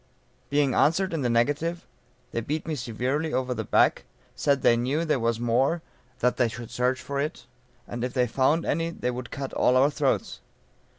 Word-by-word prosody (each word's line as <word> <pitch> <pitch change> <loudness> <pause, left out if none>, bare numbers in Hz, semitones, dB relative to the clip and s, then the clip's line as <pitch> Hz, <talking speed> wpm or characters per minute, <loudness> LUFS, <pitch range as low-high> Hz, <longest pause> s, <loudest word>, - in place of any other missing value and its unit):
Being 145 -2 +2
answered 185 +4 +2
in 160 - -1
the 125 - +1
negative, 145 +9 0 0.5
they 115 - -2
beat 150 +6 -3
me 160 - -1
severely 130 +5 -2
over 130 -1 0
the - - -3
back, - - +3 0.3
said 140 -2 +1
they 120 - +6
knew 130 +7 0
that 165 - -4
there 145 - +2
was 115 -1 0
more, 130 +8 +1 0.4
that 125 +1 +2
they 120 - +3
should 115 0 -8
search 125 +1 0
for 140 0 -4
it, 150 -3 -3 0.4
and 120 0 -5
if 125 - -1
they 125 -2 +2
found 135 +7 +1
any 165 +2 0
they 125 -7 -3
would 125 0 -6
cut 140 -2 -5
all 125 - +3
our 140 +3 +4
throats. - - -1
130 Hz, 195 wpm, -26 LUFS, 120-150 Hz, 0.5 s, they